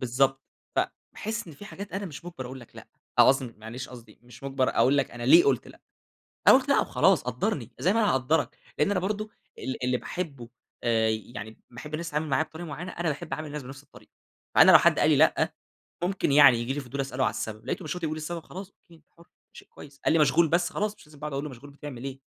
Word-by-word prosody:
بالضبط، 135 +2 +1 0.3
فباحس 215 -1 -3
إن - - -9
في 205 - -12
حاجات 200 -1 -9
أنا 195 +1 -3
مش 155 0 -9
مجبر 170 -7 -7
أقول 130 +1 -8
لك 120 - -16
لأ، - - -12 0.3
أو - - +8
قصدي 130 -3 +2
معلش 115 +4 -7
قصدي 115 -4 -13
مش 120 +1 -15
مجبر 135 -1 0
أقول 135 +3 +3
لك - - 0
أنا 120 - -8
ليه 165 +8 +7
قلت 135 -4 +1
لأ. - - -16 0.7
أنا - - +10
قلت - - +1
لأ - - +5
وخلاص، - - +3
قدرني، 125 - -2
زي 185 - +2
ما 225 - +2
أنا 210 -2 +3
هاقدرك، 140 +4 0 0.2
لإن 150 - +3
أنا 195 - +1
برضه 210 +3 -3 0.3
ال 130 -1 -5
اللي 125 0 +1
باحبه 140 -7 -6 0.8
يعني 110 -1 -8
باحب 130 +5 -10
الناس 165 +2 -3
تتعامل 150 +1 -2
معايا 135 +3 +2
بطريقة 160 +2 -9
معينة، 160 +5 -6
أنا 170 -1 -2
باحب 150 0 -4
أعامل 155 +3 -4
الناس 150 -1 -6
بنفس 135 +2 -10
الطريقة. 145 - -19 0.4
فأنا - - +9
لو - - +11
حد - - +3
قال - - +4
لي - - +5
لأ، - - +3 0.5
ممكن 180 -5 0
يعني 140 -4 +8
ييجي 120 +3 -2
لي 145 - -3
فضول 135 +1 -5
أسأل 135 -1 -4
له 130 - +3
عن - - +2
السبب، 110 0 -6
لقيته 185 - -3
مش 150 - -3
راضي 170 -2 -3
يقول 155 - -3
السبب، 165 +2 -5
خلاص 190 +1 -8
أوكي. 170 -3 -23
أنت 160 -2 -21
حُر، 170 - -17 0.3
شيء - - -13
كويس. 140 -1 -14
قال - - +3
لي 165 - +4
مشغول 155 +2 +4
بس، 175 +2 +1
خلاص 210 0 -2
مش - - -18
لازم 150 -1 -17
بقى 150 - -5
أقعد - - -9
أقول 140 - -2
له 150 - -5
مشغول 135 +3 -12
بتعمل 140 -3 -9
إيه. 135 0 -6
145 Hz, 245 wpm, -27 LUFS, 130-170 Hz, 0.8 s, لو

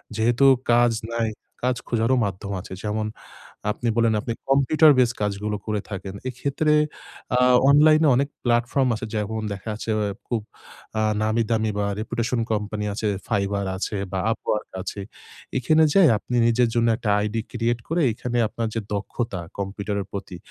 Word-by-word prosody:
যেহেতু 120 +4 +3 0.3
কাজ 120 0 +5 0.2
নাই, 115 -1 0 0.3
কাজ 125 0 +2
খোঁজারও 115 +2 +2
মাধ্যম 100 +1 -5
আছে। 95 - -9
যেমন 105 0 -1 0.6
আপনি 120 +3 -4
বললেন 115 -1 +3
আপনি 115 +1 -3 0.2
কম্পিউটার 140 +3 +5
বেস 120 -2 +4
কাজগুলো 105 +1 -1
করে 105 -1 -1
থাকেন। 95 -1 -5 0.2
এক্ষেত্রে 140 +5 0 0.6
আ - - +3 0.3
অনলাইনে 155 +2 +6
অনেক 140 +3 +1
প্লাটফর্ম 120 +2 +2
আছে। 115 +2 -5
যেমন 110 +1 -2
দেখাচ্ছে 105 +3 -6 0.4
খুব 115 -3 -1 0.6
আ - - +2 0.2
নামি 110 +2 +1
দামি 110 -1 +1
বা 100 - +1
রেপুটেশন 120 +2 -2
কোম্পানি 105 0 -2
আছে, 110 +1 -2 0.2
Fiverr 100 -2 0
আছে 105 +2 -3 0.2
বা 95 - 0
Upwork 105 -1 -2
আছে। 100 +2 -5 0.6
এখানে 155 +5 +4
যাই 195 -4 +7
আপনি 125 +4 -5
নিজের 120 0 +3
জন্য 115 0 +3
একটা 110 - -3
আইডি 105 +2 -1
ক্রিয়েট 120 0 0
করে 170 +2 +1
এখানে 120 +2 -3
আপনার 115 +2 -3
যে - - +1
দক্ষতা 100 0 -3 0.2
কম্পিউটারের 100 0 -3
প্রতি। 95 -3 -6
115 Hz, 150 wpm, -24 LUFS, 105-125 Hz, 0.6 s, যাই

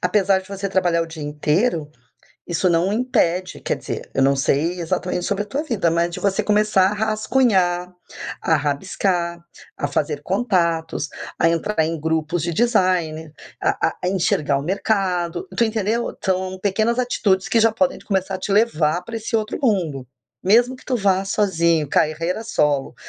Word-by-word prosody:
apesar 195 -2 +2
de 190 - -16
você 195 0 -4
trabalhar 175 -3 +1
o 165 - -5
dia 160 -1 -9
inteiro, 150 +3 0 0.6
isso 175 +2 +1
não 175 +4 +2
impede 185 -7 0
quer - - -1
dizer, - - -6
eu 135 - +2
não 140 0 +4
sei 160 +6 0
exatamente 175 +2 -2
sobre 205 +1 -1
a - - -18
tua 280 +7 -2
vida, 230 - 0
mas 170 +1 +1
de - - -6
você 200 -1 +1
começar 210 -2 +3
a - - -3
rascunhar, 210 -5 +1 0.5
a 160 - +3
rabiscar, 170 +4 -1 0.4
a - - -1
fazer - - -1
contatos, 170 - 0 0.3
a 165 - +4
entrar 170 +4 -1
em 165 0 -3
grupos 160 +1 -1
de 170 - -2
designer, 175 -7 +1 0.3
a - - +1
a - - -8
a - - +2
enxergar 155 -6 +1
o 140 - -4
mercado, 185 - -1
tu - - +2
entendeu? 220 +1 -1
São 185 0 -1
pequenas 220 +5 +1
atitudes 195 -6 +1
que 230 - +3
já 225 - +5
podem 270 +4 0
começar 190 -1 -1
a - - -3
te - - -5
levar 175 -6 +2
pra 230 +3 -6
esse 225 +1 -2
outro 215 +2 -2
mundo, 170 - 0 0.4
mesmo 240 +6 +4
que - - -18
tu 255 - 0
vá 195 -3 +2
sozinho, 170 -6 +1
carreira 165 +9 0
solo, 150 -11 0
185 Hz, 170 wpm, -21 LUFS, 165-210 Hz, 0.6 s, já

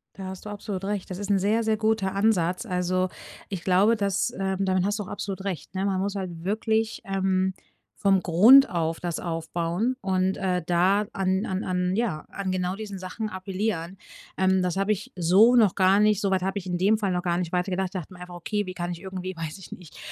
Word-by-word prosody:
Da 195 - -7
hast 190 +1 -8
du - - -6
absolut 205 -2 -5
recht. 200 -1 -3
Das 185 - -5
ist 205 -1 -5
'n 200 -1 +3
sehr, 215 +4 +1
sehr 220 -1 +1
guter 215 -3 0
Ansatz. 195 -2 +1
Also, 185 -1 0 0.4
ich 190 -4 -5
glaube, 195 +5 +4
dass, 200 +2 0
ähm 190 0 -1
damit 185 -1 +1
hast 205 +2 -1
du - - -2
absolut 195 0 -5
recht, 180 -2 -5
ne? 190 +1 -1
Man 190 -2 0
muss 200 +1 -2
halt 175 -4 -5
wirklich, 220 +3 0
ähm, 190 -1 0 0.5
vom 195 -2 +4
Grund 225 +11 +7
auf 165 -1 -2
das 175 -2 -3
aufbauen 170 +7 -2
und, 190 -2 0
äh, 180 -2 -1
da 185 +5 +3
an 190 0 0
an 190 +1 -3
an, 180 +1 0
ja 215 -10 -1
an 200 -1 -4
genau 185 0 -1
diesen 205 -2 -6
Sachen 185 +4 -5
appellieren, 190 -2 -3 0.4
ähm, 190 0 +3
das 180 0 -1
habe 195 +2 +2
ich 205 0 -8
so 195 +8 +5
noch 215 -6 +4
gar 190 +1 +4
nicht 210 -1 +3
soweit 190 -3 +1
habe 190 +2 -2
ich 190 - -11
in 180 -1 -2
dem 200 +5 +3
Fall 200 -3 -1
noch 180 -1 -1
gar 175 -1 0
nicht 175 -2 -3
weitergedacht. 185 +1 0
Ich 190 0 -4
dachte 180 +2 -10
mir 180 - -13
einfach: 180 0 -9
„Okay, 205 +4 -2
wie 185 - -6
kann 175 -1 -4
ich 170 - -10
irgendwie, 185 -1 -6
weiß 165 +1 -5
ich 190 - -10
nicht, 175 -4 -13
190 Hz, 225 wpm, -26 LUFS, 180-205 Hz, 0.5 s, Grund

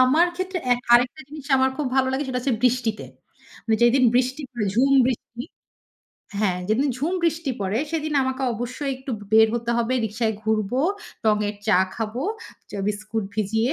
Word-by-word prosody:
আমার 295 +7 +5
ক্ষেত্রে 370 0 -3
এক 245 - 0
আরেকটা 245 +5 +4
জিনিস 295 -2 -10
আমার 265 0 +3
খুব 300 - -2
ভালো 260 0 +3
লাগে, 265 - 0
সেটা 250 -1 -1
হচ্ছে 255 -2 0
বৃষ্টিতে। 240 -3 +1 0.6
মানে, 220 -1 +2
যেদিন 250 +2 +5
বৃষ্টি, 255 +4 +1 0.3
ঝুম 270 +4 +3
বৃষ্টি 240 -1 -4 1.0
হ্যাঁ, 185 -4 +1
যেদিন 245 +7 +2
ঝুম 305 +7 -1
বৃষ্টি 330 -3 0
পড়ে, 195 +4 -1
সেদিন 310 -2 -2
আমাকে 260 +1 -2
অবশ্যই 250 +5 -4
একটু 265 +1 -8 0.2
বের 220 0 +7
হতে 235 0 -2
হবে। 235 +2 0
রিক্সায় 220 +1 -1
ঘুরব, 215 -2 0 0.5
টঙের 210 -1 +1
চা 200 -4 +5 0.2
খাবো, 225 +3 -3 0.7
বিস্কুট 215 +1 -3
ভিজিয়ে। 220 +4 0
245 Hz, 155 wpm, -23 LUFS, 220-270 Hz, 1.0 s, বের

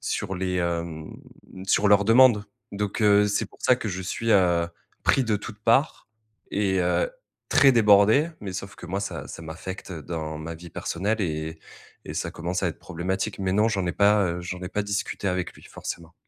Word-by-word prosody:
sur 95 -1 -3
les 90 0 -2
hem, 85 -2 -2 0.6
sur 100 - +3
leurs 100 0 +5
demandes. 115 -1 +6 0.3
Donc, 105 +2 -3
heu, 105 0 +5
c'est 105 - 0
pour - - -21
ça 125 - +5
que 115 - -4
je 95 -1 -4
suis, 115 +5 -1
heu, 85 -3 +4 0.4
pris 135 - +4
de 110 -2 +1
toutes 105 +1 -9
parts 120 +7 +2 0.4
et 95 -2 +1
heu, 90 - +1 0.4
très 135 -2 +6
débordé. 110 +7 +5
Mais, 100 -2 -5
sauf 100 0 -6
que 90 - -10
moi, 95 +3 -2
ça 100 - -5
ça 85 - -8
m'affecte, 95 +5 -7
heu, 80 - -7
dans 80 -2 -5
ma 80 +1 -6
vie 85 +1 -11
personnelle 105 +9 -2
et 80 -3 -3 0.5
et - - -6
ça - - -2
commence 90 +3 -3
à 90 - +2
être 80 - -7
problématique. 95 +4 -3
Mais, 95 -1 0
non, 105 +3 +3
j'en 95 -5 -1
ai 85 - 0
pas 100 +2 +4
heu, 85 0 -2
j'en 90 +1 -5
ai 90 - -4
pas 105 +2 -1
discuté 100 0 -3
avec 90 -1 -2
lui, - - -17
forcément. 85 -1 -7
95 Hz, 205 wpm, -25 LUFS, 85-105 Hz, 0.6 s, demandes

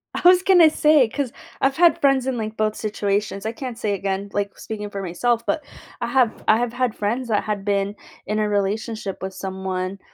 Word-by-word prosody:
I - - -2
was 365 0 +6
gonna 355 -5 +7
say, 300 -5 +4
'cause 265 0 -3 0.3
I've 270 0 +2
had 345 0 +5
friends 275 -2 +3
in, 260 -2 -1
like, 220 -1 -4
both 215 -1 0
situations, 205 -1 -2
I 220 - -1
can't 245 0 -6
say 210 -2 -1
again, 195 +1 -2
like, 200 -1 -2
speaking 210 -2 -6
for 200 -1 -5
myself, 230 +7 0
but 305 - -1 0.4
I 235 - -2
have 245 -2 +1
I 215 - +6
have 240 0 -1
had 245 -2 0
friends 235 +5 -2
that 215 -3 +1
had 210 -2 -3
been 200 0 0 0.3
in 210 +1 0
a 215 - +1
relationship 205 0 -2
with 190 0 -4
someone 190 0 -4
215 Hz, 205 wpm, -22 LUFS, 200-245 Hz, 0.4 s, gonna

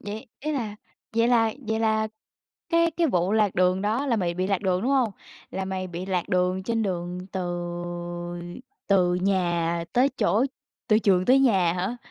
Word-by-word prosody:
vậy, 215 +5 -6
ý 305 +2 -2
là 225 -7 -3 0.4
vậy 230 +1 +4
là 225 -2 +3 0.2
vậy 220 0 0
là 220 -1 +1 0.6
cái 335 0 +3
cái 335 +1 +1
vụ 185 - +1
lạc 215 -3 +2
đường 185 +1 +2
đó 225 +7 0
là 240 -4 +2
mày 175 -4 -1
bị 185 +1 -1
lạc 195 -1 0
đường, 185 -2 +1
đúng 255 - +1
hông? 255 -5 +3 0.4
Là 190 - -3
mày 190 0 -3
bị 175 +1 -6
lạc 185 -3 -1
đường 185 +1 +1
trên 225 +2 0
đường 180 -2 -3
từ 190 - -2 1.5
từ 180 -3 +4
nhà 175 -3 0
tới 255 +3 +4
chỗ 225 +5 +3 0.4
từ 215 - +5
trường 190 -4 +3
tới 255 +5 +5
nhà 190 -10 +4
hả? 185 +7 -2
195 Hz, 185 wpm, -25 LUFS, 180-230 Hz, 1.5 s, từ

